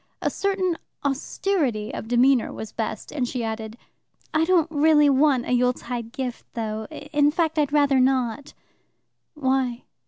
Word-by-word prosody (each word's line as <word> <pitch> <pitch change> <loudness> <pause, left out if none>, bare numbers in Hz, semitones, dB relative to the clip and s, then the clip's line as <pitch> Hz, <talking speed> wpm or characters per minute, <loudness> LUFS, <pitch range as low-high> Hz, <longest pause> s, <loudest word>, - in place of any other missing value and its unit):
A - - -1
certain 380 -3 -1 0.3
austerity 275 - -1
of - - -6
demeanour 245 +1 +3
was 220 - -7
best, 220 - -4
and 265 -5 -1
she 245 -1 -3
added: 220 0 -5 0.6
"I 315 +1 +3
don't 350 -3 +4
really 295 -1 +5
want 270 -2 +3
a - - -4
Yuletide 245 -2 0
gift, 250 -2 -5
though. 220 -1 -3
In 290 -1 +1
fact, 320 0 0
I'd 290 -2 +1
rather 285 -2 +3
not." 255 0 0 0.8
"Why?" 260 -4 0
265 Hz, 145 wpm, -24 LUFS, 240-300 Hz, 0.8 s, really